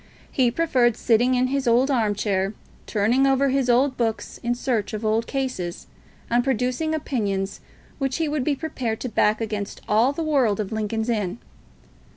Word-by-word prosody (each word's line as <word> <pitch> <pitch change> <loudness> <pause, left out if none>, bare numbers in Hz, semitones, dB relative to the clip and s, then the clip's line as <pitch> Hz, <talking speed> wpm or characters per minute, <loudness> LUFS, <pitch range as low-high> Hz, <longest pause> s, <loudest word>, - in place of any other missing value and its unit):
He 255 -4 +3
preferred 250 -5 +2
sitting 245 +2 +3
in 250 0 +2
his 270 0 -1
old 250 +4 +4
arm 220 -5 +1
chair, 195 0 -1 0.3
turning 235 +6 +2
over 270 +1 +3
his 265 -1 +1
old 255 +2 +3
books 225 -2 -2
in 240 0 0
search 235 -4 -1
of 215 +1 -4
old 220 +2 +1
cases, 255 -11 -3 0.4
and 240 +1 +2
producing 265 +5 0
opinions 200 -9 -2 0.4
which 270 -2 -1
he 325 -2 0
would 295 -2 -1
be 285 +1 +1
prepared 255 -7 -3
to 250 - -3
back 215 -1 +2
against 210 -2 -4
all 225 +5 +3
the 325 +3 -3
world 265 -10 +2
of 210 -1 -3
Lincoln's 220 +1 -2
Inn. 210 -5 -1
240 Hz, 175 wpm, -24 LUFS, 215-270 Hz, 0.4 s, old